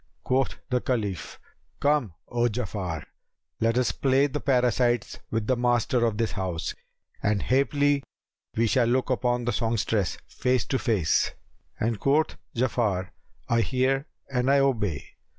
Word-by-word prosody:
Quoth 130 0 +1 0.2
the 125 -1 +2
Caliph, 105 -9 -2 0.4
"Come, 140 - +1
O 120 0 +1
Ja'afar, 95 -8 -3 0.6
let 115 +1 +2
us 125 -1 +2
play 135 +1 +3
the 145 +1 -2
parasites 125 -3 +1
with 110 -1 -1
the 130 - +2
master 120 0 +2
of 105 -2 -2
this 115 0 0
house; 90 -5 -3 0.5
and 105 -2 +1
haply 140 +2 +2 0.6
we 115 - +4
shall 120 +1 +3
look 130 +2 +1
upon 125 -1 +1
the 120 - 0
songstress, 110 -4 0
face 125 -3 0
to 130 - 0
face;" 100 -10 +2 0.5
and 110 -1 0
quoth 150 +3 +2 0.2
Ja'afar, 110 -7 0 0.4
"I 115 0 +3
hear 135 +4 +1 0.2
and 130 -1 0
I 140 - +5
obey." 110 - +1
120 Hz, 140 wpm, -26 LUFS, 110-130 Hz, 0.6 s, I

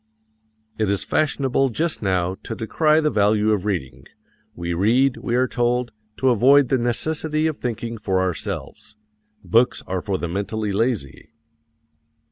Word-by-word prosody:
It 110 -2 +1
is 100 -1 0
fashionable 135 -3 +1
just 155 +8 -2
now 95 -3 0
to 115 - -6
decry 155 +8 +2
the 150 -1 +1
value 105 0 +2
of 105 -2 0
reading. 65 -11 -4 0.5
We 85 0 -3
read, 120 +9 +2
we 120 - -2
are 130 +1 +2
told, 120 -1 0 0.3
to 130 - +2
avoid 130 +3 +5
the 130 - +2
necessity 155 +6 -1
of 155 -2 -1
thinking 115 -1 -4
for 95 -2 0
ourselves. 95 +3 -4 0.5
Books 115 +2 +2
are 95 -1 -3
for 95 0 -2
the 85 - -3
mentally 100 +4 -3
lazy. 110 - -2
115 Hz, 145 wpm, -22 LUFS, 100-130 Hz, 0.5 s, avoid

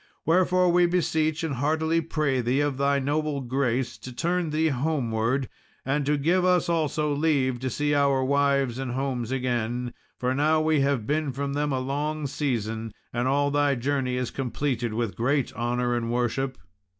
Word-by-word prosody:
Wherefore 180 +1 +3
we 175 0 +4
beseech 160 -2 0
and 160 -3 -1
heartily 160 +5 +1
pray 150 -5 0
thee 125 +3 +1
of 145 -2 0
thy 140 0 +2
noble 145 +1 -1
grace, 130 -1 -1
to 130 - -8
turn 170 +6 -1
thee 160 +1 +1
homeward, 130 -3 0 0.4
and 140 +1 0
to 150 0 +2
give 170 +6 +2
us 180 -1 +3
also 155 -3 0
leave 140 -4 +1
to 130 +1 -2
see 145 +3 0
our 140 -2 +3
wives 140 -2 +1
and 130 -2 -3
homes 130 -3 -2
again, 125 -1 -1 0.2
for 125 0 0
now 155 +3 +3
we 155 -1 +2
have 135 -5 +1
been 150 +1 0
from 140 +2 -3
them 145 0 0
a 135 - 0
long 145 +3 -2
season, 115 -6 -2 0.2
and 120 +1 0
all 145 +1 +2
thy 145 -1 +2
journey 130 0 -1
is 125 -1 -2
completed 125 -2 -2
with 115 -5 -2
great 135 +5 0
honour 120 +1 -1
and 115 -1 -2
worship." 125 +2 -1
140 Hz, 175 wpm, -26 LUFS, 125-150 Hz, 0.4 s, we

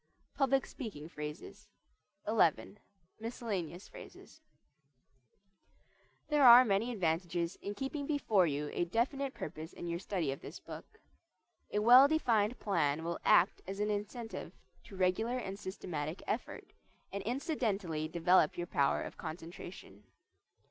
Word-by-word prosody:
PUBLIC 270 -1 +2
SPEAKING 180 - -8
PHRASES 160 +7 -8 0.6
XI. 205 -2 +2 0.4
MISCELLANEOUS 210 -6 -4
PHRASES 315 - -13 1.9
There 295 -2 +3
are 245 0 +10
many 215 +3 +1
advantages 170 -3 -1
in 205 +1 -5
keeping 275 +4 -4
before 220 - +2
you 145 0 -2
a - - 0
definite 260 +8 -1
purpose 160 +1 -7
in - - -8
your 170 0 -2
study 180 -7 -2
of 135 - -6
this - - -9
book. 440 - -11 0.7
A - - -1
well 245 +6 +8
defined 240 -7 +1
plan 160 -6 0
will 170 +1 -3
act - - +4
as 195 +1 -5
an 210 0 0
incentive 220 +3 -5 0.3
to 210 - -11
regular 190 +7 +1
and 195 -5 -5
systematic 170 -4 -5
effort, 220 - -4 0.4
and 200 - -3
incidentally 205 - -2
develop 170 0 +3
your 175 - -2
power 140 -4 +1
of - - -8
concentration. 165 - -9
195 Hz, 125 wpm, -33 LUFS, 170-235 Hz, 1.9 s, are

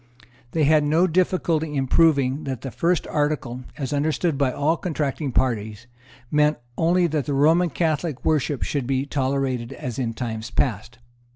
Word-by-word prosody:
They 160 - +2
had 150 +1 +4
no 160 +5 +3
difficulty 165 -3 0
in 135 -1 0
proving 140 -2 +3
that 130 -3 -4
the 135 - -6
first 165 +9 0
article, 140 -4 -2
as 135 -1 -3
understood 155 +2 0
by 135 -2 +1
all 145 +3 +1
the - - -15
contracting 150 -4 -2
parties, 110 -3 -1 0.5
meant 150 0 +3 0.2
only 175 +2 +2
that 155 -4 -1
the 145 - 0
Roman 165 +5 +4
Catholic 160 -3 -2
worship 150 -3 +1
should 140 -4 -2
be 135 0 0
tolerated 135 -3 -1
as 125 -1 -6
in 115 -3 -2
time 110 -2 -4
past. 120 -1 -1
145 Hz, 165 wpm, -23 LUFS, 130-155 Hz, 0.5 s, had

